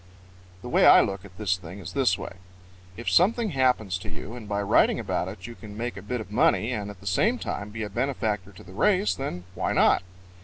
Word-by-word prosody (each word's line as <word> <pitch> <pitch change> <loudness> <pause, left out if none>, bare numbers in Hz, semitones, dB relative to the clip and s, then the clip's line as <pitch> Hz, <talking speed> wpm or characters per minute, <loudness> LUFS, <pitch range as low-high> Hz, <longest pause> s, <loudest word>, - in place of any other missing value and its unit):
_ - - -24
The - - -6
way - - +4
I - - +9
look 95 0 -3
at 90 -2 -15
this 95 -4 0
thing 90 +1 -10
is 90 -2 -8
this 125 -10 +2
way: 95 - -8 0.6
If 120 - -8
something 215 +4 +3
happens 125 - +1
to 95 - -8
you 95 +6 -8
and 110 -4 -9
by 100 0 -1
writing 100 - +3
about - - -2
it 95 0 -8
you 120 - -7
can 105 -2 -11
make 120 +1 -3
a 95 - -7
bit 120 +5 -3
of 105 -3 -8
money 115 +1 +2
and 105 -4 -3
at 100 -3 -11
the - - -14
same 210 - +2
time 105 - -4
be 110 +1 -5
a - - -3
benefactor 110 -5 -2
to 90 - -14
the 95 - -13
race, 200 - +2
then 90 -10 -5
why - - -1
not? - - +4
105 Hz, 240 wpm, -26 LUFS, 95-125 Hz, 0.6 s, I